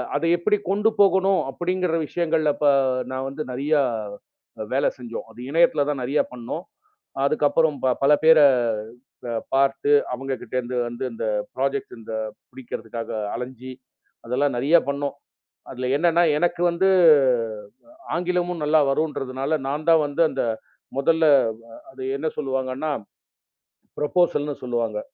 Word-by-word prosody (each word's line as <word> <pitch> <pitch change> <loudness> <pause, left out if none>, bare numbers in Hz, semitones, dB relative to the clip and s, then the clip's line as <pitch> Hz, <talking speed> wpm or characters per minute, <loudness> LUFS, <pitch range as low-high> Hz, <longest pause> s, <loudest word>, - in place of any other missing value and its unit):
அத 145 - -1
எப்டி 210 +4 +1
கொண்டு 210 +3 +2
போகணும் 195 -1 +4
அப்டிங்கிற 180 +2 -1
விஷயங்கள்ல 160 -3 +1
ப - - +2 0.5
நான் 130 +1 -3
வந்து 145 +3 -7
நெறைய 140 +5 -2 1.0
வேல 135 - +1
செஞ்சோம். 120 -2 -7
அது 120 - -16
இணையத்துல 165 -2 +3
தான் 140 -3 -2
நெறைய 140 +4 +1
பண்ணோம். 125 +8 -6 0.6
அதுக்கப்புறம் 150 +1 +2
ப 130 -1 +3
பல 140 - +5
பேர 160 -1 +7 0.9
அ - - -2 0.2
பார்த்து 135 +1 +2 0.2
அவங்ககிட்ட 130 0 -5
இருந்து 125 +1 -5
வந்து 120 +2 -6
இந்தப் 105 -2 -2
ப்ராஜக்ட் 135 0 -2
இந்த 110 - -10 0.4
புடிக்கறதுக்காக 115 -2 -7 0.3
அலைஞ்சி 130 +1 -7 0.5
அதெல்லாம் 130 +2 0
நெறைய 145 +7 +4
பண்ணோம். 140 0 -2 0.6
அதுல 125 0 -4
என்னன்னா 170 +2 +3 0.2
எனக்கு 175 0 0
வந்து 190 +3 +1 1.3
ஆங்கிலமும் 180 -1 -1
நல்லா 155 +1 +4
வரும்ன்றதுனால 140 0 -1
நான் 150 +3 -3
தான் 160 -2 +5
வந்து 145 +4 0
அந்த 135 - -2 0.5
முதல்ல 160 +4 +2 0.7
அத 135 - -21 0.2
என்ன 150 - -4
சொல்லுவாங்கன்னா, 135 +1 -2 1.1
ப்ரோபோசல்ன்னு 150 -2 +1
சொல்லுவாங்க. 115 -4 -2
145 Hz, 120 wpm, -23 LUFS, 130-165 Hz, 1.3 s, பேர